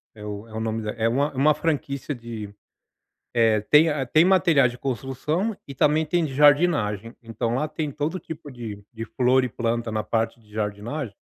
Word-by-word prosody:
é 105 - -11
o 105 +1 -6
é 110 - -15
o 110 - -3
nome 110 0 -2
da 105 - -2
é 115 0 0
uma 140 +5 +1
é - - -15
uma 150 +3 +5
franquia 145 -2 -2
de, 115 -5 -8 0.8
eh, 115 -2 +4
tem 155 +2 +7
a 145 -3 -1
tem 155 +6 +4
material 175 -8 +4
de 120 +1 -9
construção 140 - -2
e 140 - -7
também 150 +4 +3
tem 170 +2 +1
de 140 -4 -4
jardinagem. 145 - +3
Então 115 +1 -2
lá 150 +5 0
tem 155 -1 -3
todo 150 +6 -2
tipo 160 -4 -9
de, 115 -5 -7
de 115 -1 -6
flor 130 +2 +2
e - - -1
planta 115 0 -2
na 110 0 -1
parte 115 +1 -1
de 105 -2 -24
jardinagem 105 +4 -4
125 Hz, 200 wpm, -24 LUFS, 115-150 Hz, 0.8 s, tem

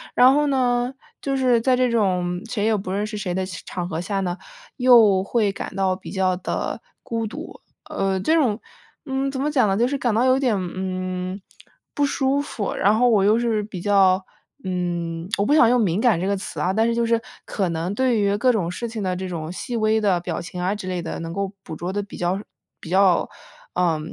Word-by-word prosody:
然 255 +2 +7
后 295 0 +2
呢， 250 -2 +1 0.3
就 275 -1 -1
是 250 -3 +3
在 255 +1 +3
这 250 -1 +2
种 180 -5 0
谁 215 -4 -1
也 220 -1 +3
不 190 -2 -4
认 205 +2 -1
识 215 0 -6
谁 190 -3 -3
的 190 0 -1
场 175 -1 -6
合 165 -1 -3
下 195 +1 -2
呢， 180 -1 -2 0.4
又 225 -7 +6
会 210 -1 +1
感 195 - -7
到 190 -1 +1
比 185 - -10
较 185 -2 +1
的 180 - -3 0.2
孤 225 -1 -2
独。 305 +10 -9 0.3
呃， 190 -1 -1
这 315 +12 +1
种， 240 -9 +2 0.5
嗯， 270 0 -1
怎 265 -1 -4
么 295 +2 0
讲 255 -7 +3
呢， 195 0 +1
就 240 +2 +3
是 280 +1 -1
感 235 -4 0
到 240 +3 +3
有 260 +1 +4
点， 245 -6 +2
嗯， 185 +1 -4 0.5
不 290 - 0
舒 275 +1 +1
服， 215 -8 -4
然 210 +2 +3
后 245 +1 +4
我 210 -5 +4
又 215 +3 +4
是 230 -3 +1
比 205 -3 -7
较， 190 -1 +3 0.4
嗯， 175 -1 -3
我 200 - +1
不 290 - +2
想 245 -7 +6
用 250 0 +3
敏 195 -1 +1
感 220 -9 +3
这 185 - -2
个 200 - +1
词 190 - -6
啊， 185 - +1
但 220 +2 +2
是 235 - 0
就 235 0 +1
是 230 0 +1 0.2
可 190 -4 -1
能 165 +4 -2
对 245 -1 +1
于 200 0 +2
各 250 +4 +3
种 180 -7 -1
事 235 +5 -4
情 220 -2 -5
的 185 -1 -1
这 185 0 -5
种 165 -1 -5
细 235 +5 -4
微 215 0 +2
的 190 -4 +2
表 170 -2 -4
情 180 +1 -7
啊 185 +3 0
之 195 -3 -6
类 180 -1 -2
的， 165 - -5
能 165 0 -5
够 200 +2 -3
捕 160 - -7
捉 175 +4 -4
得 205 - -1
比 200 - -10
较 180 +3 -1 0.4
比 165 - -10
较， 190 -1 +3 0.5
呃， 170 -3 +2
200 Hz, 245 characters per minute, -22 LUFS, 185-235 Hz, 0.5 s, 然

